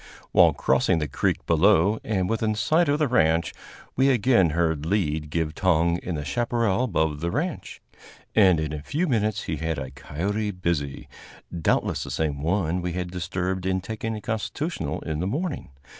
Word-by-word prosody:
While - - +6
crossing - - +2
the 75 -2 -1
creek - - -1
below, 95 +4 +4
and 95 -4 0
within 110 0 0
sight 160 +8 +2
of 145 - +3
the 150 -1 +1
ranch, 80 -8 +2 0.4
we 135 +2 +4
again 115 -7 +4
heard 80 -2 0
Lead 80 -4 -1
give 80 0 -1
tongue 85 -1 +2
in 90 - -4
the 75 -1 -4
chaparral 115 - 0
above 80 - 0
the 85 +3 -2
ranch, 160 - -4 0.5
and 95 -6 +5
in 75 -1 -3
a 75 - -5
few 155 - -1
minutes 110 -5 0
he 80 - -3
had 80 +1 -2
a 65 -2 -5
coyote 100 +10 -3
busy, 85 -7 -3 0.5
doubtless 85 - 0
the - - -7
same 75 -3 -2
one 90 +1 0
we 90 -1 -3
had 90 0 -4
disturbed 90 +1 -3
in 95 0 0
taking 110 +3 -4
a 105 - -6
constitutional 110 - -3
in 80 -2 -3
the 90 - -1
morning. 150 - -3
90 Hz, 175 wpm, -25 LUFS, 80-110 Hz, 0.5 s, While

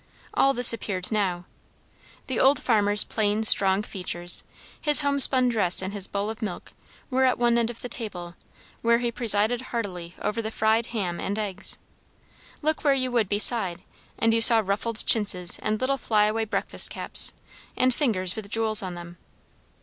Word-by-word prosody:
All 275 0 +1
this 245 -1 +6
appeared 190 -4 -5
now. 185 -5 -2 0.8
The 260 - -4
old 270 +1 +3
farmer's 210 -3 +4
plain 210 0 -2
strong 195 -2 +4
features, 175 -3 -1 0.4
his 295 -1 +7
homespun 280 -3 +6
dress 200 -7 +1
and 190 +1 -2
his 200 -2 +1
bowl 200 +2 -4
of 225 - -12
milk, 205 -5 -7 0.4
were 260 +1 0
at 255 -1 +1
one 240 -1 +1
end 235 -1 0
of 240 - -10
the - - -6
table, 180 -8 -7 0.5
where 235 0 +2
he 240 0 -3
presided 225 +1 +1
heartily 185 -9 -7
over 230 +2 -3
the 220 - -5
fried 220 +1 -1
ham 190 -7 -5
and 200 +2 -4
eggs. 205 -2 -5 0.9
Look 310 +1 -2
where 285 -2 +2
you 255 -1 -3
would 230 -5 -1
beside, 205 -4 +1 0.3
and 225 0 +1
you 230 - +1
saw 225 -1 +7
ruffled 215 +3 -3
chintzes 185 -5 +1
and 215 0 -3
little 275 +1 -2
fly 210 -2 +1
away 220 +1 -2
breakfast 220 - -3
caps, - - -4 0.5
and 255 0 +1
fingers 195 - 0
with 215 -2 -9
jewels 220 -1 -1
on 185 -2 -7
them. 175 0 -12
220 Hz, 175 wpm, -24 LUFS, 195-240 Hz, 0.9 s, his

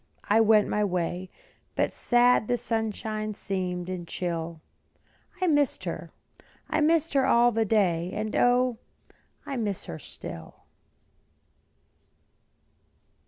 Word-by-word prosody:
I 220 +2 +4
went 215 -1 +5
my 210 - 0
way, 180 -1 -2 0.5
But - - 0
sad 240 -2 +3
the 245 - +1
sunshine 215 -2 -3
seemed, 180 -3 -3
and 180 -2 -5
chill; 170 -2 -3 0.8
I 370 - +1
missed 290 -5 +2
her, - - -5 0.6
missed 315 +1 +2
her 270 -1 +3
all 240 -1 +5
the 225 0 +1
day, 180 -5 +1
And 215 +1 -3
O, 245 -1 +3 0.7
I 275 - -4
miss 205 -5 -2
her 80 - -7
still. 80 -1 -9
215 Hz, 115 wpm, -27 LUFS, 180-245 Hz, 0.8 s, went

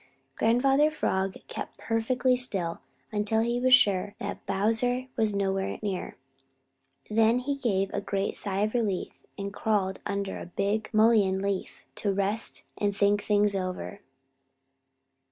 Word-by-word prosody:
Grandfather 270 +6 +3
Frog 190 -11 -1
kept - - -6
perfectly 250 +3 +1
still 195 -9 -3 0.3
until 215 +1 +1
he 235 +1 0
was 255 0 +7
sure 205 -4 +1
that 205 - -5
Bowser 230 +6 0
was 215 -2 +1
nowhere 195 -1 -1
near. 195 -3 -3 0.9
Then 225 +2 +4
he 255 +3 -1
gave 200 -8 0
a 200 - -1
great 195 0 -2
sigh 195 -1 -1
of 215 +1 0
relief 210 -7 -1 0.2
and 200 0 -4
crawled 200 -3 0
under 200 -1 -3
a - - -7
big 205 +4 -1
mullein 215 -4 +4
leaf 200 -1 -3
to 205 - 0
rest, 200 +3 -1 0.2
and 205 -1 0
think 205 0 +3
things 205 -1 +2
over. 185 +1 -4
205 Hz, 135 wpm, -28 LUFS, 195-230 Hz, 0.9 s, was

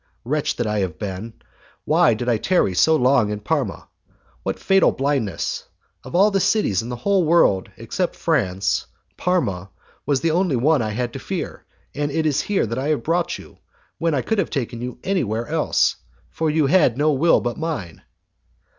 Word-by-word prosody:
Wretch 150 +4 -1
that 120 - -2
I 105 -1 0
have 90 -5 -2
been! 105 +4 -5 0.5
Why 115 - +4
did 120 +3 -5
I 120 -2 +3
tarry 140 - +1
so 160 - +4
long 125 -5 +3
in 105 0 -3
Parma? 105 - -2 0.5
What - - -3
fatal 195 -1 +3
blindness! 130 - -2 0.4
Of - - -8
all 200 +4 +5
the 195 - +2
cities 195 - +2
in 115 - -7
the 120 - -3
whole 190 +9 +1
world, 155 - +3
except - - -3
France, 95 +1 0 0.3
Parma 100 - -1 0.4
was 140 -3 +1
the 165 - +1
only 175 -3 +1
one 145 +3 +3
I 110 - -1
had 120 +2 -3
to - - -6
fear, - - -5 0.3
and 145 0 -2
it 155 +2 -1
is 150 -3 +2
here 205 -8 0
that 115 +3 -3
I 135 - -2
have 150 -6 0
brought 170 +2 0
you, - - -15 0.4
when 165 -2 +1
I 130 - 0
could 220 -2 0
have 190 - 0
taken 120 -4 -3
you 125 0 -5
anywhere 120 - -1
else, 155 +2 +1 0.3
for 160 -1 -1
you 155 -1 +2
had 140 -5 +3
no 150 +2 +3
will 150 +4 +4
but 120 -1 -4
mine! 150 - -4
135 Hz, 190 wpm, -22 LUFS, 110-165 Hz, 0.5 s, all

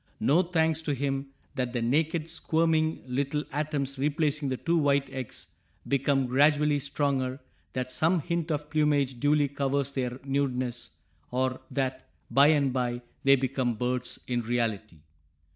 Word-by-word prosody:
No 155 +6 +4
thanks 160 -3 +1
to 150 -3 -1
him 135 0 -2 0.3
that 125 -3 -2
the 120 - -1
naked, 155 +6 +1
squirming 160 -1 +1
little 140 +3 -1
atoms 145 -2 -2
replacing 145 0 0
the 130 - -1
two 170 +4 +1
white 140 -2 +2
eggs 130 -4 -6 0.3
become 135 0 +2
gradually 145 +3 +3
stronger, 140 -2 -1 0.3
that 130 0 -3
some 165 +6 +2
hint 170 +1 -2
of 150 -1 -3
plumage 145 -4 +2
duly 145 +1 +3
covers 140 0 -1
their 125 -2 -3
nudeness, 130 -3 -1 0.4
or 130 +1 -1
that 130 -1 -2 0.2
bye 140 +1 +6
and 145 -4 +3
bye 120 -1 -1 0.2
they 140 0 +6
become 130 -2 -1
birds 125 +2 -2
in 120 -1 -1
reality. 110 -7 -2
140 Hz, 145 wpm, -28 LUFS, 130-150 Hz, 0.4 s, bye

